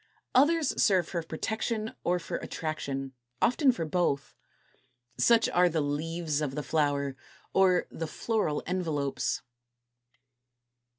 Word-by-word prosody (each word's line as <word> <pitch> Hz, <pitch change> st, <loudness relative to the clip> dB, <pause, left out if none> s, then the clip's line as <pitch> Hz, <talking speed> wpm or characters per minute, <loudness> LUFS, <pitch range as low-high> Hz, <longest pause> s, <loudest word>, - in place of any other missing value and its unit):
Others 305 Hz, +3 st, +3 dB
serve 185 Hz, -5 st, +4 dB
for 170 Hz, -, -2 dB
protection 215 Hz, +7 st, -3 dB
or 180 Hz, +1 st, +2 dB
for 175 Hz, -, -4 dB
attraction, 135 Hz, -4 st, -4 dB, 0.3 s
often 265 Hz, +3 st, +4 dB
for 200 Hz, -10 st, -3 dB
both. 150 Hz, -5 st, 0 dB, 0.9 s
Such 230 Hz, -1 st, +5 dB
are 180 Hz, 0 st, +4 dB
the 160 Hz, -1 st, 0 dB
leaves 155 Hz, +1 st, -1 dB
of 140 Hz, -3 st, -2 dB
the 150 Hz, -, -2 dB
Flower, 145 Hz, -3 st, 0 dB, 0.4 s
or 185 Hz, -2 st, +4 dB
the 165 Hz, -, -4 dB
Floral 210 Hz, -6 st, -1 dB
Envelopes. 145 Hz, -7 st, -1 dB
165 Hz, 115 wpm, -29 LUFS, 145-195 Hz, 0.9 s, Such